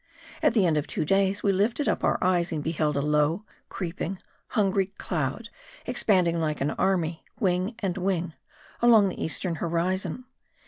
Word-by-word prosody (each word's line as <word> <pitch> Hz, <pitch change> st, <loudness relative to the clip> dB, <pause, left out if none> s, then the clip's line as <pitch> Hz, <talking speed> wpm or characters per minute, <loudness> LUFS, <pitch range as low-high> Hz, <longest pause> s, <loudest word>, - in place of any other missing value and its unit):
At 235 Hz, -, +3 dB
the 205 Hz, -5 st, +4 dB
end 155 Hz, -3 st, +3 dB
of 145 Hz, -, -5 dB
two -, -, -2 dB
days 195 Hz, +3 st, +2 dB
we 200 Hz, -, +4 dB
lifted 215 Hz, +9 st, +1 dB
up -, -, 0 dB
our -, -, +2 dB
eyes 180 Hz, -1 st, +2 dB
and 155 Hz, -3 st, -2 dB
beheld 155 Hz, -2 st, 0 dB
a 140 Hz, -, 0 dB
low, 150 Hz, +6 st, +1 dB, 0.2 s
creeping, 180 Hz, +1 st, -4 dB, 0.3 s
hungry 195 Hz, -3 st, +1 dB
cloud 160 Hz, -, -3 dB, 0.4 s
expanding 175 Hz, -5 st, +2 dB
like 155 Hz, -2 st, -1 dB
an 140 Hz, +2 st, 0 dB
army, 170 Hz, -4 st, 0 dB, 0.2 s
wing 185 Hz, +3 st, 0 dB
and 195 Hz, -4 st, -2 dB
wing, 180 Hz, -3 st, -1 dB, 0.5 s
along 225 Hz, -4 st, +6 dB
the -, -, -5 dB
eastern 165 Hz, +2 st, -2 dB
horizon. 180 Hz, +8 st, -1 dB
180 Hz, 165 wpm, -26 LUFS, 160-195 Hz, 0.5 s, along